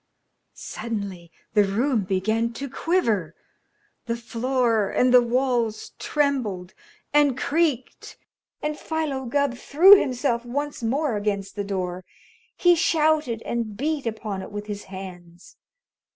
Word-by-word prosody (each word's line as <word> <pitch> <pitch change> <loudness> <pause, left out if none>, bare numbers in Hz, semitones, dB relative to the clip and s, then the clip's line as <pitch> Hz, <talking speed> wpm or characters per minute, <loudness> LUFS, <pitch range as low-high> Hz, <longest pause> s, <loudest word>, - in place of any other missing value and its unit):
Suddenly 200 -7 -6 0.2
the 210 -2 +5
room 220 +2 0
began 220 +5 0
to 280 +4 -5
quiver. 230 - 0 0.7
The 230 - 0
floor 235 -2 0
and 250 0 +2
the 250 - +8
walls 240 -2 0
trembled 245 -12 -1 0.4
and 290 -3 +4
creaked, 285 -3 -1 0.5
and 300 0 -2
Philo 305 -5 -2
Gubb 280 +1 +1
threw 345 +10 +7
himself 250 -2 -1
once 285 +4 -4
more 255 +1 0
against 200 -1 -2
the 205 - -2
door. 185 -2 -3 0.5
He 355 -2 +5
shouted 310 -8 +1
and 225 -3 -3
beat 295 -1 -1
upon 215 -3 -4
it - - -9
with 205 0 -5
his 205 -1 -6
hands. 180 -2 -11
235 Hz, 125 wpm, -24 LUFS, 205-280 Hz, 0.7 s, the